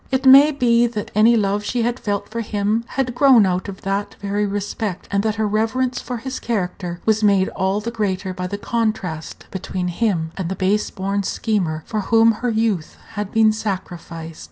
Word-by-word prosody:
It 265 0 -1
may 275 +3 +9
be 240 -4 +3
that 215 -3 -5
any 220 +3 +5
love 205 0 0
she 240 +2 -1
had 240 +2 -1
felt 205 -1 -2
for 230 +1 -4
him 210 +1 -1
had 255 -2 0
grown 250 -4 +6
out 185 +1 -1
of 195 - -9
that 195 +1 -2
very 205 +1 -1
respect, 200 -1 -4
and 200 0 +2
that 215 0 -1
her 220 0 0
reverence 225 +5 0
for 250 - -5
his 260 +3 -5
character 180 -5 -3
was 220 0 +2
made 200 -2 +4
all 190 +2 -1
the 230 +2 -4
greater 190 -4 -2
by 180 0 -4
the 200 - -4
contrast 205 -8 -3
between 185 -1 -3
him 175 -4 -1
and 185 -3 -3
the 190 - -2
base 200 +3 +1
born 195 +1 -2
schemer 185 -7 -1
for 215 - -2
whom 225 +3 +4
her 240 +3 -2
youth 220 -7 -1
had 210 -3 -5
been 220 -1 +4
sacrificed. 175 -6 -5
210 Hz, 195 wpm, -21 LUFS, 190-230 Hz, -, may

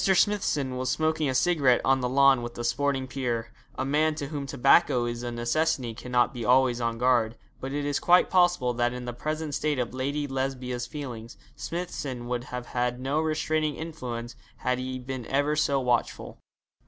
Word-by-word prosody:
Smithson 185 -9 +2
was 130 0 -2
smoking 155 -2 +1
a 130 - -1
cigarette 140 -5 +3
on 135 0 +4
the 125 - 0
lawn 135 -1 +5
with 120 0 -7
a 120 - -4
sporting 135 +2 0
peer. 120 -4 -3 0.2
A - - -2
man 150 +3 +2
to 145 -3 -5
whom 145 -3 -4
tobacco 135 -1 +4
is 120 0 -3
a 120 0 -4
necessity 120 +1 0
cannot 125 +2 0
be 120 -2 -5
always 125 0 +3
on 115 -1 -1
guard; 120 -2 +2 0.2
but 135 - -5
it 145 0 -2
is 145 -1 0
quite 180 +1 +5
possible 175 -9 +3
that 120 0 0
in 125 0 -6
the 120 - -4
present 155 +4 -3
state 150 0 0
of 125 -1 -2
Lady 140 +3 -2
Lesbia's 130 -2 -3
feelings 120 -6 -7 0.2
Smithson 145 -8 -5
would 120 0 -2
have 125 -2 -6
had 125 0 -2
no 140 +4 0
restraining 155 -1 0
influence 125 -8 -6 0.2
had 125 0 -1
he 130 0 -4
been 130 -1 -6
ever 145 +2 +1
so 140 -2 +2
watchful. 125 -2 -1
130 Hz, 185 wpm, -27 LUFS, 120-150 Hz, 0.2 s, lawn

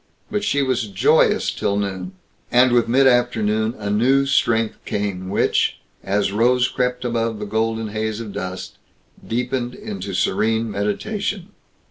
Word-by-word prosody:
But 205 0 -1
she 145 -10 +1
was 130 -4 0
joyous 95 -2 +3
till 100 - -1
noon; 95 -2 -3 0.4
and 125 +1 +5
with 120 -1 +3
mid 130 +3 +4
afternoon 110 -3 +2
a 100 -1 -3
new 130 +6 +3
strength 115 -5 +1
came 100 -3 -3
which, 100 - +1 0.3
as 100 0 0
rose 125 +4 +3
crept 125 0 -2
above 115 -2 -1
the 105 - -5
golden 110 +1 -1
haze 110 +1 -3
of 110 -3 -7
dust, 95 0 -6 0.5
deepened 125 +1 -2
into 205 - -6
serene 110 +4 +1
meditation. 185 - -2
115 Hz, 140 wpm, -21 LUFS, 105-125 Hz, 0.5 s, and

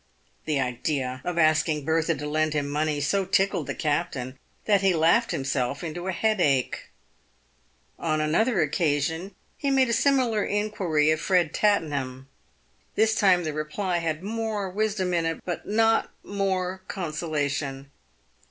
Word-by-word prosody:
The 150 -3 0
idea 130 0 -2
of 180 -1 -3
asking 155 -2 +2
Bertha 160 +1 +1
to 150 +1 -6
lend 155 +1 0
him 145 -1 0
money 150 +1 -1
so 195 +7 +1
tickled 190 +1 +1
the - - -3
captain 145 -5 -2 0.3
that 200 -3 +3
he 190 -2 +3
laughed 170 +9 +3
himself 135 +1 -2
into 175 +2 -5
a - - 0
head 215 +2 +1
ache. 135 -5 +1 1.1
On 155 -2 0
another 190 +8 +2
occasion, 160 +4 0 0.2
he 280 - 0
made 265 -2 +3
a - - +1
similar 250 -5 +2
inquiry 190 -8 +1
of 155 - +1
Ered 180 -5 +2
Tatten 200 -7 +2
ham. 130 -1 -4 0.7
This 220 +1 +3
time 185 -4 +4
the 155 -2 -3
reply 170 +4 -2
had 160 0 -3
more 215 -2 -3
wisdom 200 -2 -1
in 170 -1 +1
it, 165 - -2
but 175 -2 -4
not 225 +2 +2
more 190 -2 -2
con 175 -5 -4
solation. 145 -3 -2
165 Hz, 150 wpm, -26 LUFS, 150-200 Hz, 1.1 s, time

